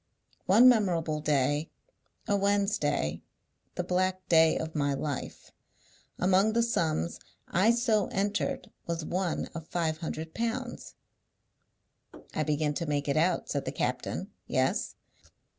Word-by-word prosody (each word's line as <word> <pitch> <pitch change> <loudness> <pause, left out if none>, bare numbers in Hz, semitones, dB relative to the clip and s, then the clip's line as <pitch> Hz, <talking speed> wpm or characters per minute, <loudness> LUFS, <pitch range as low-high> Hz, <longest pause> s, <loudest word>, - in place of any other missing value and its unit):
One 220 +7 +7
memorable 175 -10 +3
day, 145 +1 +1 0.6
a 205 - +2
Wednesday, 200 - +1 0.5
the 180 - -1
black 185 +1 -1
day 160 -1 +5
of 160 0 -4
my 145 -2 0
life, 140 -1 -5 0.7
among 195 +4 +3
the 235 +1 +3
sums 165 - -1 0.3
I 190 +6 +3
so 230 -4 +2
entered 200 +1 -2 0.2
was 165 -2 -2
one 180 0 -1
of 165 -1 -7
five 160 -2 -1
hundred 160 0 -5
pounds." 240 +2 -4 1.4
"I - - -1
begin 150 -1 0
to 170 +2 -3
make 145 -1 -1
it 140 - +1
out," 170 +3 +2
said 140 - -2
the - - -2
captain. - - -3 0.2
"Yes?" - - 0
170 Hz, 125 wpm, -29 LUFS, 155-200 Hz, 1.4 s, One